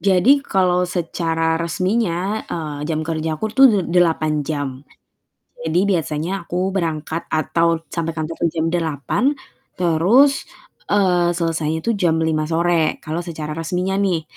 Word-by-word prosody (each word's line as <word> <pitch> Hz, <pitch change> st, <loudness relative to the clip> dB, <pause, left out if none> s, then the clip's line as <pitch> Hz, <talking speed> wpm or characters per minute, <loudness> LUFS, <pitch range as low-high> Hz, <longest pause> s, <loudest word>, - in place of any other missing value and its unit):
Jadi, 200 Hz, +9 st, +4 dB
kalau 180 Hz, -7 st, +1 dB
secara 165 Hz, -2 st, -1 dB
resminya, 190 Hz, +3 st, -1 dB
eee, 150 Hz, -2 st, -4 dB
jam 155 Hz, -1 st, -1 dB
kerjaku 160 Hz, +2 st, -3 dB
tuh 270 Hz, +3 st, +7 dB
de 210 Hz, -4 st, +3 dB, 0.2 s
delapan 155 Hz, -3 st, +2 dB
jam, 145 Hz, -3 st, -4 dB, 0.9 s
jadi 160 Hz, +3 st, +2 dB, 0.2 s
biasanya 155 Hz, +1 st, -3 dB, 0.2 s
aku 180 Hz, +2 st, -1 dB
berangkat 165 Hz, -3 st, -3 dB
atau 165 Hz, +1 st, +1 dB
sampai 165 Hz, -1 st, -3 dB
kantor 160 Hz, 0 st, -4 dB
tuh -, -, 0 dB
jam 160 Hz, -1 st, 0 dB
8 165 Hz, -, 0 dB, 0.4 s
terus, 190 Hz, -, +3 dB, 0.4 s
eee, 180 Hz, -4 st, +2 dB
selesainya 160 Hz, -2 st, -1 dB
tuh 230 Hz, -, 0 dB
jam 175 Hz, -4 st, +2 dB
05:00 155 Hz, -1 st, 0 dB
sore, 165 Hz, 0 st, +1 dB
kalau 155 Hz, +2 st, -4 dB
secara 160 Hz, -3 st, -5 dB
resminya 180 Hz, +4 st, -1 dB
nih. 185 Hz, -5 st, +1 dB
170 Hz, 135 wpm, -20 LUFS, 160-185 Hz, 0.9 s, tuh